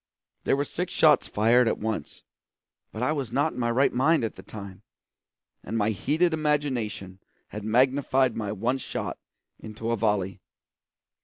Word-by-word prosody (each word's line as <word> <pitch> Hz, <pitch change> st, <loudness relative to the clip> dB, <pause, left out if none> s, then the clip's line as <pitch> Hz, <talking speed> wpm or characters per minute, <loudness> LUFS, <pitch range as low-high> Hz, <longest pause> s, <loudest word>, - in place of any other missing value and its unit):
There -, -, +2 dB
were 145 Hz, -, 0 dB
six 180 Hz, +4 st, -4 dB
shots 155 Hz, -2 st, +4 dB
fired 115 Hz, +3 st, +3 dB
at -, -, +1 dB
once; 110 Hz, -8 st, -4 dB, 0.7 s
but 110 Hz, -, -4 dB
I 130 Hz, -, +2 dB
was 140 Hz, -7 st, -3 dB
not 145 Hz, +5 st, +1 dB
in -, -, -7 dB
my 120 Hz, -1 st, +1 dB
right 130 Hz, +4 st, +2 dB
mind 145 Hz, +4 st, +3 dB
at 115 Hz, -, -2 dB
the -, -, -12 dB
time, 100 Hz, -3 st, -10 dB, 0.8 s
and 115 Hz, -, -3 dB
my 105 Hz, 0 st, +2 dB
heated 155 Hz, -, +1 dB
imagination 130 Hz, -11 st, -1 dB, 0.3 s
had 105 Hz, 0 st, -7 dB
magnified 130 Hz, +2 st, +2 dB
my 105 Hz, -3 st, -3 dB
one 120 Hz, +6 st, -1 dB
shot -, -, -5 dB, 0.4 s
into 110 Hz, +1 st, -5 dB
a -, -, +2 dB
volley. 100 Hz, -3 st, -1 dB
120 Hz, 160 wpm, -26 LUFS, 105-140 Hz, 0.8 s, shots